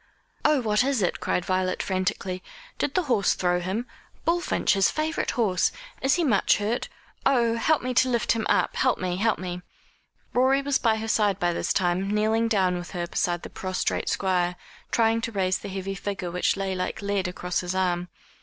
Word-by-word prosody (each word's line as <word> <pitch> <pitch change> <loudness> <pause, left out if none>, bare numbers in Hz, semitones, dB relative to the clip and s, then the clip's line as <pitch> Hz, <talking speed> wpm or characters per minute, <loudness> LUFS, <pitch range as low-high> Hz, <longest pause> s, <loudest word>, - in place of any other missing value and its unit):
"Oh, 300 -3 +4
what 215 0 +2
is 265 -6 +1
it?" 175 - 0
cried 180 - -1
Violet 185 0 0
frantically. 185 -1 -2 0.4
"Did 280 - -1
the 370 - +3
horse 235 - +2
throw 180 -1 +1
him? 190 +7 -2 0.4
Bullfinch, 345 +1 +2
his 195 -1 +3
favourite 310 +1 -1
horse. 195 -7 +2 0.3
Is 270 +2 +3
he 350 - +1
much 220 -10 +3
hurt? 215 +4 -2 0.3
Oh, 235 -4 +3
help 300 +6 +2
me 255 0 -1
to 255 +1 +4
lift 235 -3 +1
him 225 -1 0
up - - +2
help 260 -2 +2
me 180 -1 -2
help 220 +2 +2
me!" 180 -1 -5 0.7
Rorie 265 +2 +3
was 280 -1 +1
by 225 -2 +3
her 220 0 -4
side 210 -3 +2
by 175 0 +1
this - - -1
time, 185 +1 +1
kneeling 220 +2 +2
down 190 -5 +2
with 175 - -8
her 175 -1 -2
beside 175 0 -1
the - - -8
prostrate 185 -1 -2
Squire, 180 -2 +1 0.3
trying 225 0 +2
to 230 - -3
raise 190 -3 0
the - - -7
heavy 195 0 -4
figure 195 -2 -4
which 180 +2 +1
lay 195 -1 -2
like 185 +2 -3
lead 200 -2 0
across 180 0 -2
his 180 +1 -3
arm. 180 -1 0
195 Hz, 195 wpm, -26 LUFS, 185-230 Hz, 0.7 s, Oh